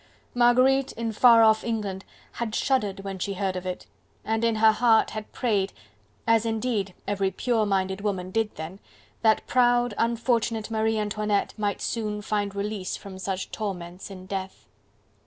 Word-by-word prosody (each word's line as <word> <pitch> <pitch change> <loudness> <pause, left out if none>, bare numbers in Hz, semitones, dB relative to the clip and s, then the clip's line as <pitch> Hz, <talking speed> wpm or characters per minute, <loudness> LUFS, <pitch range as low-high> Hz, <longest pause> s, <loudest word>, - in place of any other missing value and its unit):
Marguerite, 255 +3 +4
in 230 0 -3
far 230 +1 +6
off 220 0 +4
England, 205 -4 -3 0.3
had 230 -2 -4
shuddered 210 -8 0
when 195 -1 -6
she 200 +2 -2
heard 190 -1 -1
of 185 0 -4
it, 180 0 -5 0.4
and 225 +1 0
in 230 -1 +2
her 220 0 +6
heart 225 0 +3
had 215 -1 -7
prayed, 205 -5 0 0.5
as 225 -1 +4
indeed 220 -4 -1
every 200 -1 +1
pure 225 +1 0
minded 190 0 0
woman 190 -3 -2
did 225 +1 -1
then, 160 +5 -7 0.4
that 220 -1 +3
proud, 245 -2 +3
unfortunate 230 -1 0
Marie 220 0 +1
Antoinette 210 -1 -1
might 205 -2 -2
soon 210 -2 -2
find 205 -1 -1
release 200 -2 -3
from 190 -2 -10
such 190 0 -4
torments 180 -4 -5
in 185 -2 -10
death. 190 0 -5
210 Hz, 155 wpm, -26 LUFS, 195-230 Hz, 0.5 s, far